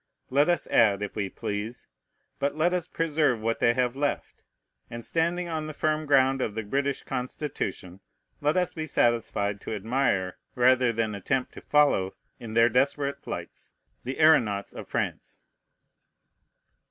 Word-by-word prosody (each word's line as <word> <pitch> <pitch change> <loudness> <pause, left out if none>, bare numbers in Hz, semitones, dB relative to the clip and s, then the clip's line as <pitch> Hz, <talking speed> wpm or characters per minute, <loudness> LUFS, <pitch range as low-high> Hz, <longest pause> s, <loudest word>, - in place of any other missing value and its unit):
Let 145 +5 +4
us 175 - +1
add, 105 -3 +3
if 105 - -5
we 100 -2 -2
please, 105 +6 -5 0.5
but 140 +1 0
let 170 +3 +2
us 180 -2 -1
preserve 155 -8 +1
what 115 +1 -1
they 120 - +3
have 125 -1 0
left; 145 +1 -2 0.5
and 120 0 -7
standing 170 +2 0
on 160 -2 -3
the 155 - -7
firm 155 0 0
ground 135 -1 +4
of 105 -4 -2
the 110 - -2
British 140 +5 -1
Constitution, 125 - -4 0.4
let 150 +4 +2
us 180 -1 +1
be 155 -1 -4
satisfied 105 -6 0
to - - -4
admire, 105 -4 0 0.2
rather 125 0 +4
than 110 -1 -1
attempt 125 +6 -2
to - - -10
follow 145 -11 +2 0.2
in 110 -2 -7
their 115 0 +6
desperate 140 +3 +1
flights, - - -8 0.3
the 130 +2 -4
aëronauts 115 -11 +3
of - - -8
France. - - -4
130 Hz, 155 wpm, -27 LUFS, 110-150 Hz, 0.5 s, their